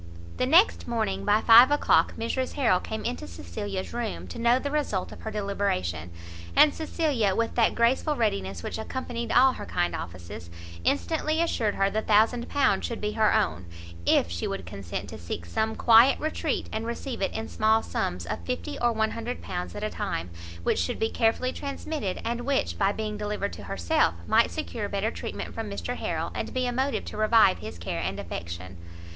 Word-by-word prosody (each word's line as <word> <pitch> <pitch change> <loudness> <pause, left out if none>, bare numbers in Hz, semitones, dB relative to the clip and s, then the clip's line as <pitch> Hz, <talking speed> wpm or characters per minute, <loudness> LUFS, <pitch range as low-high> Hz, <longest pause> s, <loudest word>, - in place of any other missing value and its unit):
The 255 - +1
next 345 +10 +4
morning 100 - -1
by 215 +1 +4
five 235 +3 +9
o'clock 290 0 +3
Mrs 255 +3 -2
Harrel 235 -10 +3
came 220 +3 -5
into 80 - -3
Cecilia's 185 - -5
room 235 -3 -3
to - - -7
know 235 +1 +4
the 285 +2 -3
result 285 -11 -1
of - - -11
her 220 - -4
deliberation; 195 - -2 0.5
and 300 - +7
Cecilia, 290 - 0
with 230 0 0
that 230 -2 +3
graceful 260 +6 +2
readiness 95 - -1
which - - -4
accompanied 235 0 -4
all 260 +1 +6
her - - -7
kind 85 0 0
offices, 85 0 -8 0.3
instantly 95 - 0
assured 235 -11 +1
her 195 0 +2
the 220 - 0
thousand 225 +3 +3
pound 285 -1 +2
should 235 - -3
be 210 0 -2
her 215 -1 +3
own, 85 +2 0 0.4
if 85 - +3
she 85 0 -2
would 95 - -4
consent 85 +1 -6
to - - -8
seek 85 0 -5
some 220 - -1
quiet 235 +3 +6
retreat, 310 0 -2
and 220 +1 -3
receive 235 0 -4
it 195 - +1
in 220 0 -4
small 220 +1 +2
sums, 90 -1 -2
of - - -4
fifty 255 +4 -4
or 240 0 +3
one 220 -1 0
hundred 230 +2 -4
pounds 180 0 -5
at 205 - -5
a 215 - 0
time, 85 +1 -3 0.3
which - - +1
should 85 - -1
be 220 - 0
carefully 240 +2 +1
transmitted, 280 -7 -4
and 235 +1 -1
which, 275 +2 0
by 195 -1 +2
being 215 0 -4
delivered 210 -1 -2
to 100 - -9
herself, 85 -3 +1
might - - +4
secure 85 - -4
better 200 +3 -1
treatment - - -6
from - - -4
Mr - - -4
Harrel, - - -2
and - - -4
be 255 0 +1
a 245 - 0
motive 265 +3 -1
to - - -7
revive 215 -2 +5
his 105 -4 -7
care 85 0 -4
and 95 +4 -3
affection. 85 +2 -6
220 Hz, 195 wpm, -27 LUFS, -, 0.5 s, five